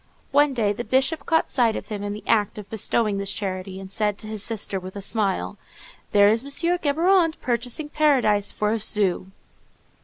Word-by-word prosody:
One 290 -1 +3
day 210 -4 +1
the 240 - -5
Bishop 270 +6 0
caught 325 -1 +2
sight 235 -4 +2
of - - -6
him 210 -2 -4
in 205 0 -3
the 210 - -8
act 210 -2 +1
of 210 -2 -8
bestowing 215 -1 0
this 200 0 -2
charity, 190 -1 -4
and 190 0 -10
said 210 0 -1
to 215 - -8
his 215 -1 -5
sister, 205 -3 -2
with 185 +1 -9
a - - -5
smile, 200 -2 -1 0.5
"There 205 0 +6
is 220 +2 +3
M. 280 - -9
Géborand 335 +2 +2
purchasing 245 +5 -2
paradise 265 -10 +2
for 210 0 -1
a 225 - 0
sou." 200 -4 +1
215 Hz, 190 wpm, -23 LUFS, 205-275 Hz, 0.5 s, There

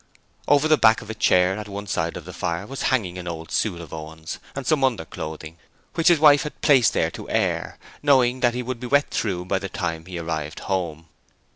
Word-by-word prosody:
Over 145 +2 +4
the 155 -1 +4
back 110 0 +5
of 110 - -7
a - - -4
chair 90 -3 +3
at 105 - -7
one 100 0 -6
side 85 -4 -2
of 85 - -9
the 90 - -9
fire, 85 0 -3
was 135 +4 -6
hanging 95 -9 0
an 90 - -7
old 80 -1 -6
suit 95 -6 0
of 85 -3 -10
Owen's, 80 0 -7 0.2
and 135 -1 -5
some 155 -4 +2
underclothing, 80 -8 -3 0.3
which 165 - +1
his 175 - +7
wife 145 -2 +7
had 150 - -6
placed 130 -7 +5
there - - +1
to - - -9
air, - - -1 0.2
knowing 130 -3 +3
that 120 -1 +2
he 125 - -2
would 125 -1 -4
be 125 - -5
wet 140 +3 +2
through 90 -5 -2
by 95 +1 0
the 95 - -5
time 85 -2 -4
he 90 -2 -6
arrived 80 -2 -4
home... 85 -4 -3
95 Hz, 225 wpm, -23 LUFS, 85-130 Hz, 0.3 s, his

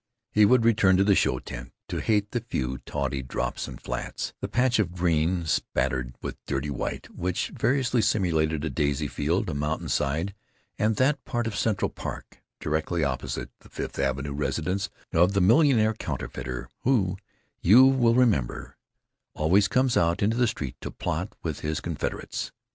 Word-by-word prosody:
He 105 0 +5
would 120 +1 +4
return 100 -5 +5
to 95 - +4
the 100 0 +4
show 65 - +2
tent, - - -8 0.2
to - - -2
hate 105 -2 +1
the 120 - 0
few 65 - -3
tawdry 70 -2 -2
drops 65 - -3
and - - -9
flats—the - - -4
patch 125 -1 +2
of 90 -5 0
green 85 0 +1
spattered 65 -4 -1
with - - -6
dirty 70 +2 -2
white 65 - -4
which 90 +1 -1
variously 125 -2 +1
simulated 80 -7 +1
a 80 - -2
daisy 70 +1 0
field, 85 +8 -1
a 85 - -2
mountainside, 75 +3 -1 0.5
and 110 +1 +2
that 135 +6 +2
part 120 -2 -2
of 115 -2 -3
Central 110 -3 +1
Park - - -8 0.2
directly 80 +2 -1
opposite 65 -3 -3
the - - -18
Fifth - - -6
Avenue 70 +1 -1
residence 90 +7 -1 0.2
of 90 +4 +4
the 100 - +2
millionaire 110 - +5
counterfeiter, 65 - -5
who, 105 -8 +2 0.5
you 130 +9 +7 0.2
remember, 115 - +1 0.6
always 90 +6 +3
comes 125 +3 +2
out 85 +3 +2
into 110 +3 +2
the 125 0 +3
street 70 - -4
to - - -5
plot - - -3
with - - -3
his 75 0 -2
confederates. - - -4
90 Hz, 160 wpm, -26 LUFS, 75-110 Hz, 0.6 s, you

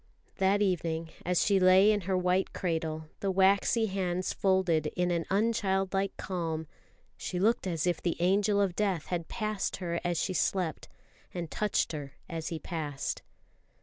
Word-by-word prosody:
That 195 +2 +3
evening, 165 -3 -1 0.2
as 180 -1 +2
she 200 -2 +4
lay 185 +3 +6
in 210 -1 +1
her 190 - +2
white 180 +1 +1
cradle, 160 -3 -2
the 195 - -1
waxy 195 +4 +3
hands 185 -2 -1
folded 185 -5 +2
in 180 -1 +1
an 170 -1 0
unchildlike 195 -2 +1
calm, 165 -4 -3 0.5
she 180 - -4
looked 210 +2 +2
as 165 -3 -1
if 175 -2 0
the 170 - -1
angel 200 +3 +3
of 195 -3 +1
Death 195 -6 0
had 170 -2 -2
passed 215 -3 -2
her 170 -2 -3
as 175 -2 0
she 185 - -1
slept, 180 -3 -1 0.5
and 170 -3 -4
touched 210 -1 0
her 145 -3 -6
as 165 -2 -4
he 165 - -3
passed. 150 -4 -4
185 Hz, 160 wpm, -30 LUFS, 165-195 Hz, 0.5 s, lay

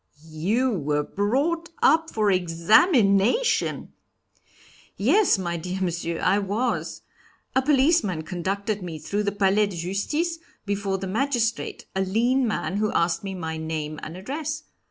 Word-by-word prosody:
"You 215 +12 +1
were 150 -6 0
brought 280 - -1
up 320 +2 +4
for 210 -2 +1
examination?" 200 - +3 1.0
"Yes, 320 - +4
my 175 -2 -3
dear 180 +3 -4
Monsieur, 170 -2 -2
I 200 - +2
was. 210 +5 -2 0.5
A 265 - +4
policeman 265 - +2
conducted 195 +5 -3
me 170 -3 -6
through 200 +7 -2
the 205 -1 0
Palais 205 +1 +2
de 195 - -7
Justice, 295 - -2 0.3
before 200 -1 -1
the 190 - -5
magistrate, 235 +3 -1
a 190 - +1
lean 235 +7 +1
man, 205 -2 -2
who 215 0 0
asked 170 +1 +1
me 195 -1 -5
my 160 -3 -4
name 155 -1 -4
and 165 +3 -7
address. 305 +9 -4
200 Hz, 135 wpm, -24 LUFS, 180-255 Hz, 1.0 s, up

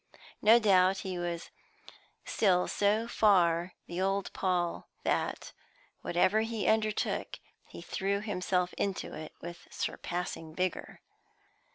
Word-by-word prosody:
No 220 +3 +7
doubt 190 -4 +4
he 185 -2 -3
was 170 -1 -4 0.7
still 180 -4 +2
so 210 +3 +1
far 180 -6 +3
the 175 +2 -4
old 195 +1 0
Paul, 180 -2 -1
that, - - -1 0.5
whatever 185 +5 +2
he 225 -1 -2
undertook, 215 -1 0 0.3
he - - -10
threw 200 +1 -1
himself 180 -3 -1
into 195 -1 -2
it 155 0 -7
with 170 0 -9
surpassing 175 -2 -4
vigour. 185 -1 -3
185 Hz, 110 wpm, -31 LUFS, 175-205 Hz, 0.7 s, No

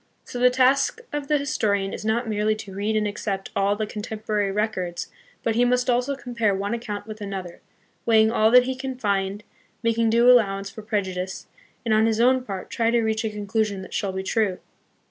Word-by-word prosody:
So 245 - -6
the 250 0 +6
task 260 - +3
of 295 -1 -3
the 300 - +3
historian 200 -8 0
is - - -6
not 225 +2 0
merely 215 0 +1
to 205 -3 -9
read 205 +3 -1
and 215 -1 +1
accept 200 -1 -4
all 200 +1 +2
the 215 +1 -2
contemporary 210 -1 -2
records, 195 -4 -2 0.3
but 225 - +1
he 240 +2 +3
must 250 +1 +2
also 250 +3 0
compare 235 -5 -1
one 200 +3 -2
account 215 -4 -4
with 215 0 -9
another, 190 -4 -6 0.4
weighing 220 -1 +4
all 220 -1 +4
that 250 +2 +7
he 260 +1 -2
can 260 0 -5
find, 200 -3 -1 0.4
making 230 0 +2
due 235 +2 +4
allowance 195 -5 +4
for 220 - -9
prejudice, 190 -4 -3 0.4
and 225 - +2
on 220 +1 +4
his 225 -1 0
own 255 +2 +4
part 195 -6 -6
try 230 -1 +1
to 235 0 +2
reach 220 0 0
a 220 - 0
conclusion 210 -1 -2
that - - -11
shall 200 -2 -1
be 190 0 -4
true. 200 -2 0
220 Hz, 205 wpm, -24 LUFS, 200-240 Hz, 0.4 s, that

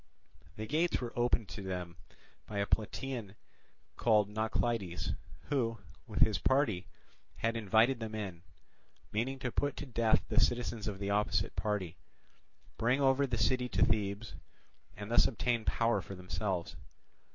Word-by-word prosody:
The 110 - -4
gates 160 +8 +1
were 120 -2 -5
opened 120 -3 +2
to 100 - -6
them 90 -3 -4 0.5
by 105 - -5
a 100 - +2
Plataean 110 0 -2 0.6
called 105 -3 +4
Naucleides, 110 -3 -1 0.4
who, 120 -6 +1 0.3
with - - -3
his - - +5
party, 110 -8 +2 0.5
had 115 0 0
invited 115 +4 +3
them 110 -1 -4
in, 95 -6 -5 0.7
meaning 120 +6 -1
to 125 -2 -3
put 145 +4 -1
to - - -4
death 115 -4 +2
the - - +3
citizens 120 -3 +1
of 105 -2 -3
the 100 0 -2
opposite 105 +1 +1
party, 100 -5 -2 0.8
bring 120 +4 +3
over 135 0 +4
the 120 -2 -1
city 125 +2 +2
to - - +4
Thebes, 105 0 -1 0.6
and 105 +3 -6
thus 120 - +6
obtain 120 -2 0
power 115 -3 +2
for 95 +2 -8
themselves. 90 0 -3
110 Hz, 145 wpm, -33 LUFS, 100-120 Hz, 0.8 s, thus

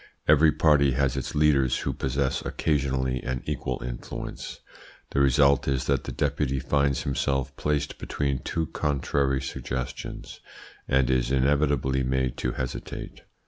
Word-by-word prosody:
Every 75 +1 +6
party 70 -3 +4
has 65 0 +1
its 65 - -4
leaders, 70 -4 +3
who - - -2
possess 65 +1 -1
occasionally 65 -4 0
an 65 -1 -3
equal 65 -3 -3
influence. - - -6 0.5
The - - +1
result 70 0 +4
is 65 -2 0
that - - 0
the - - -4
Deputy 70 -2 0
finds 70 0 +1
himself 70 -1 -1
placed 75 0 -1
between 70 -2 -1
two 80 +6 -2
contrary 70 -2 0
suggestions, 65 -1 -5 0.5
and 65 -1 +3
is 60 -2 +1
inevitably 70 0 +2
made 65 -1 0
to 60 - -1
hesitate. 65 -1 -6
70 Hz, 135 wpm, -26 LUFS, 65-70 Hz, 0.5 s, Every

